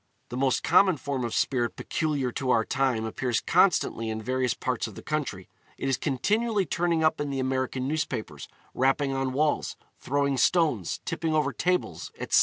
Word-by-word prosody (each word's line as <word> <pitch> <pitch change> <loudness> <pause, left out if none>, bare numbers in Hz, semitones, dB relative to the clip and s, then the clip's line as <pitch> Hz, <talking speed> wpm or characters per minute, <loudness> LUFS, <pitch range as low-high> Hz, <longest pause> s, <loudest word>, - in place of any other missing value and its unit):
The - - -6
more 135 0 +3
common 190 -5 +5
form 135 -1 -3
of 120 - -2
spirit 120 -4 0
peculiar 145 -5 -1
to 130 +2 -3
our 115 -3 +3
time 125 -4 0
appears 120 +1 -1
constantly 135 - +2
in 110 0 -3
various 125 +2 0
parts - - -2
of - - -11
the - - -10
country; - - -3 0.3
it - - -3
is 135 - +1
continually 205 - 0
turning 170 -1 0
up 155 -1 +2
in 145 - -2
the 135 -1 -2
American 130 0 -1
newspapers, 125 - -3 0.3
rapping 135 +1 +1
on 135 -1 -1
walls, 150 +3 0 0.2
throwing 140 0 0
stones, 150 - +2
tipping 160 -1 -1
over 145 -3 +1
tables, 180 - -1
etc. - - +3
135 Hz, 175 wpm, -27 LUFS, 125-155 Hz, 0.3 s, common